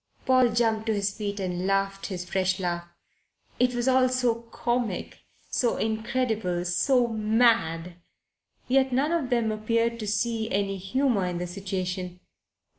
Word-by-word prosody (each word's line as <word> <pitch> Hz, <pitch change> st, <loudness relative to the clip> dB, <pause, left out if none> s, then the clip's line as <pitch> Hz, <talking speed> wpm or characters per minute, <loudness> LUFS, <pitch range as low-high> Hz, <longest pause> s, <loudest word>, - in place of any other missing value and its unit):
Paul 255 Hz, -2 st, +5 dB
jumped 225 Hz, -1 st, +1 dB
to 220 Hz, -, +2 dB
his 200 Hz, -1 st, -1 dB
feet 205 Hz, -1 st, -4 dB
and 180 Hz, -1 st, -2 dB
laughed 195 Hz, 0 st, 0 dB
his 180 Hz, -3 st, -5 dB
fresh 190 Hz, 0 st, 0 dB
laugh. 175 Hz, -2 st, -2 dB, 0.7 s
It 250 Hz, 0 st, +2 dB
was 240 Hz, +1 st, -1 dB
all 260 Hz, -1 st, +4 dB
so 250 Hz, -2 st, +2 dB, 0.2 s
comic, 240 Hz, -6 st, -2 dB, 0.3 s
so 240 Hz, -, +1 dB
incredible, 220 Hz, -5 st, -1 dB
so 245 Hz, +8 st, +2 dB
mad. 215 Hz, -7 st, +2 dB, 0.7 s
Yet 265 Hz, +1 st, +3 dB
none 275 Hz, +5 st, +1 dB
of 325 Hz, -7 st, 0 dB
them 235 Hz, -3 st, +1 dB
appeared 230 Hz, +2 st, 0 dB
to 215 Hz, -, -4 dB
see 220 Hz, +1 st, 0 dB
any 195 Hz, 0 st, 0 dB
humour 205 Hz, 0 st, 0 dB
in 175 Hz, -1 st, -3 dB
the 175 Hz, -, -3 dB
situation. 185 Hz, -1 st, -4 dB
215 Hz, 145 wpm, -26 LUFS, 190-240 Hz, 0.7 s, Paul